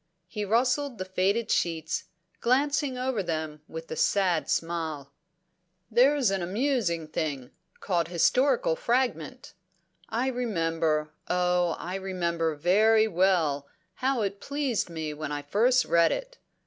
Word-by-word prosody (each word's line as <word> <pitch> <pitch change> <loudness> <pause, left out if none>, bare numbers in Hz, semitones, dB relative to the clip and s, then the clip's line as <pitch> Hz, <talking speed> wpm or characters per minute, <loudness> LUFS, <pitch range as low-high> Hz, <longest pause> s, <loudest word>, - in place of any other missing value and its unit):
He 210 -1 -4
rustled 250 +4 +1
the 185 - -4
faded 190 +5 0
sheets, 160 -2 -1 0.3
glancing 275 +1 +1
over 255 -4 -1
them 155 -3 -4
with 160 0 -8
a - - -2
sad 190 -2 +1
smile. 160 -4 -2 0.8
"There's 255 0 +4
an 195 -1 -1
amusing 190 - 0
thing 145 -5 -3 0.3
called 175 -4 0
'Historical 235 - +2
Fragment.' 255 +2 -1 0.6
I 235 +3 -1
remember, 165 -10 -1 0.2
oh 180 -1 +1
I 180 - -6
remember 170 -4 -1
very 215 +8 +4
well, 170 -7 +1 0.3
how 260 +1 0
it 200 0 -3
pleased 280 -9 -1
me 160 -2 -4
when 150 0 -5
I 145 0 -3
first 240 - +3
read 170 0 +4
it." - - -5
185 Hz, 125 wpm, -27 LUFS, 165-245 Hz, 0.8 s, There's